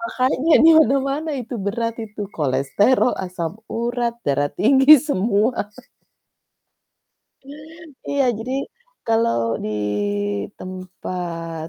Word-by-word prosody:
Makanya 285 0 0
di - - +8
mana-mana 275 +2 +1
itu 245 +1 -7
berat 230 +2 -2
itu 210 0 -11 0.2
kolesterol, 145 - +2
asam 175 -3 -4 0.2
urat, 235 0 -1
darah 145 +1 +1
tinggi, 270 +5 +6 0.2
semua. 220 0 +1 2.5
Iya 280 -1 +1
jadi 250 +3 -5 0.5
kalau 230 - +2 0.3
di - - -3 0.9
tempat 175 -3 -6
225 Hz, 85 wpm, -21 LUFS, 180-260 Hz, 2.5 s, di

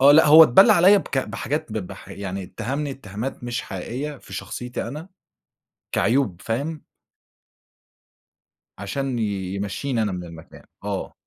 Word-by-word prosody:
آه 140 +2 +8
لأ، 160 +1 +7
هو 155 +2 +10
اتبلّى 155 +9 +7
عليَّ 190 +4 +6
بك 140 - -3
بحاجات 115 +2 -3
ب 110 - -1
بح 90 - -11
يعني 95 -1 -5
اتّهمني 135 +10 -4
اتهامات 120 0 -6
مش 120 0 -3
حقيقية 130 +10 -5
في - - -15
شخصيتي 125 -1 -5
أنا 155 +8 -8 0.8
كعيوب 115 -8 +1
فاهم؟ 145 +7 -3 1.9
عشان 125 +6 -3
ي 100 -4 -2
يمشّيني 110 +5 -2
أنا 105 -3 -1
من 90 -1 -5
المكان، 85 -1 -12 0.2
آه. - - -3
120 Hz, 140 wpm, -23 LUFS, 100-140 Hz, 1.9 s, هو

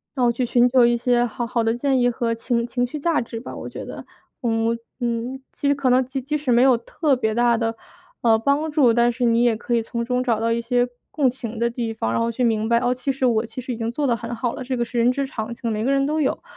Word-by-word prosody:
然 255 -3 +2
后 235 - +4
去 245 +1 -1
寻 240 +1 +4
求 250 -1 +5
一 240 0 +3
些 240 0 +2
好 240 0 -4
好 235 -1 0
的 225 0 +1
建 265 +1 +1
议 245 0 +3
和 230 -1 -1
情 235 0 -1
情 245 0 0
绪 300 +4 -6
价 335 +2 +1
值 230 -1 -6
吧 240 - -8
我 - - -7
觉 - - -7
得。 - - -8 0.4
我 230 -1 +1 0.2
嗯， 240 +2 -3
其 285 - -2
实 285 - +3
可 275 -2 0
能 255 0 +4
即 265 +1 -4
即 300 +4 -2
使 280 -3 -2
没 240 +1 +5
有 260 -2 +5
特 280 +5 0
别 220 -4 -1
大 240 -1 +3
的， 225 -1 -1 0.5
呃， 225 -2 +4
帮 285 +6 +1
助， 280 -6 +4
但 240 0 +3
是 245 +1 -4
你 235 0 +3
也 235 -2 +3
可 240 - -1
以 230 - +1
从 235 0 -3
中 250 0 0
找 235 -4 +1
到 230 +1 0
一 235 - -1
些 245 +1 +1 0.2
共 275 -4 +2
情 235 -3 -6
的 235 0 +2
地 230 -2 -3
方， 110 - -2
然 - - +1
后 230 0 0
去 250 +2 -2
明 220 -2 +1
白 235 0 +4
哦， 245 - +1
其 255 +2 -2
实 265 0 -5
我 230 -2 +2
其 255 - -7
实 255 - -5
已 - - -6
经 225 0 -2
做 285 +3 -1
得 235 -1 +1
很 235 +1 -6
好 240 0 -2
了， - - -6
这 255 0 -3
个 240 - +1
是 240 +1 -6
人 240 +2 +4
之 275 +1 -2
常 225 -2 -5
情， 230 -2 -3
每 215 +1 -2
个 270 - +2
人 275 0 +2
都 310 +1 0
有。 265 - -1
240 Hz, 315 characters per minute, -22 LUFS, 230-260 Hz, 0.5 s, 求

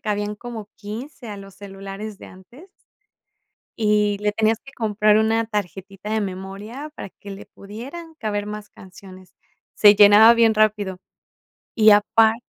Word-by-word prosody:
cabían 210 -1 -3
como 220 -1 -9
15 230 +5 -9
a 205 - -7
los 195 -1 -12
celulares 195 +1 -9
de - - -12
antes. 245 - -16 1.1
Y 210 -2 +1
le 210 0 -1
tenías 220 +1 +1
que 275 - -13
comprar 215 -3 +2
una 225 +1 +1
tarjetita 195 -1 -6
de 220 - 0
memoria, 200 +8 -7
para - - -8
que 200 - -13
le 195 0 -10
pudieran 275 +12 -10
caber 205 -7 -4
más 210 0 -7
canciones. 185 0 -15 0.4
Se 205 -1 +7
llenaba 210 +3 +8
bien 230 -1 +3
rápido, 210 -3 +1 0.8
y 220 -1 +6
apar 220 +2 +4
210 Hz, 145 wpm, -21 LUFS, 200-220 Hz, 1.1 s, llenaba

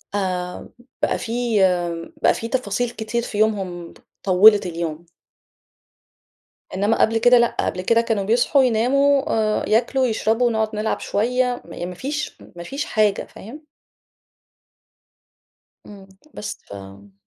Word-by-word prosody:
آآ، 180 -2 -3 0.3
بقى - - +1
في 225 - -6 0.9
بقى - - +4
في 230 - -5
تفاصيل 245 -1 -1
كتير 235 0 -3
في 230 -2 -6
يومهم 190 -5 -1 0.3
طوّلت 200 +2 +6
اليوم. 170 -1 -5 1.7
إنما 205 +4 +1
قبل 225 +1 +3
كده 245 +2 +5
لأ، 235 0 +2
قبل 180 - -1
كده 230 +5 +3
كانوا 225 -4 -1
بيصحوا، 240 +6 +3
يناموا، 270 +4 +3 0.4
آآ - - -5
ياكلوا، 250 +4 +2
يشربوا، 225 +1 +1
نقعد 220 -1 -1
نلعب 215 +1 -1
شوية 250 +3 -1
م 175 +1 -6
ما 180 - -8
فيش 290 - -4 0.2
ما 175 - -8
فيش 275 +11 -4
حاجة، 210 -3 +1
فاهم؟ 275 +10 -12 2.2
امم، 200 -2 -13 0.3
بس 210 0 -6
فامم 100 0 -12
220 Hz, 125 wpm, -21 LUFS, 185-240 Hz, 2.2 s, طوّلت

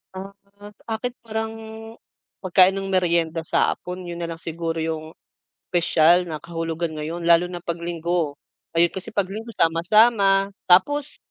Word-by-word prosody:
Ah, 195 +1 -7 0.6
akin 230 +2 -3
parang 220 -1 -4 0.9
pagkain 185 0 +5
ng 195 - -5
merienda 170 -3 +1
sa - - +1
hapon 180 0 -8
yun 170 0 -6
nalang 165 -1 -5
siguro 165 0 -4
yung 160 0 -4 0.6
spesyal 175 0 +3
na 155 -3 -6
kahulugan 165 -1 -4
ngayon 165 +3 -5
lalo 170 +1 +6
na 175 -1 -7
'pag 170 -1 -3
linggo, 170 -2 -2 0.4
ayun 170 +1 +4
kasi 190 +4 -8
'pag 195 -2 0
linggo 225 +3 -7
sama-sama 195 +4 +3 0.2
tapos 290 +12 +3
175 Hz, 140 wpm, -23 LUFS, 165-195 Hz, 0.9 s, lalo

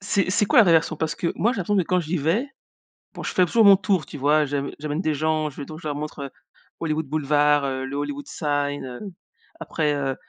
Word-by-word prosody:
C'est 195 -1 0
c'est 210 +2 +2
quoi 265 - +4
la 225 - +9
vrai 175 - +4
version? 160 -1 +2
Parce 160 0 -2
que 170 - -2
moi, 235 +4 +2
j'ai 215 - -5
l'impression 200 +3 0
que 190 - +3
quand 180 +2 +1
j'y 165 +1 -2
vais, 170 - 0 0.7
bon - - -8
je - - -4
fais 185 - +4
toujours 225 +6 +3
mon 200 -1 +8
tour, 190 -4 0
tu 150 - -9
vois? 150 +3 +3
J'amè 140 0 -3
j'amène 150 +1 -3
des 155 - 0
gens, 155 +1 0
je 135 - -16
vais - - -5
donc 155 0 -9
je 155 - -5
leur 145 - -2
montre, 150 0 -6
heu, - - -7 0.5
Hollywood 160 -1 -1
Boulevard, 150 0 +2
heu, 130 -1 -3
le 135 +1 -6
Hollywood 145 0 -4
Sign, 145 -2 -2
heu, 125 -1 -8 0.6
après, 150 -2 -1
heu, 135 -2 -2
155 Hz, 250 wpm, -23 LUFS, 145-180 Hz, 0.7 s, la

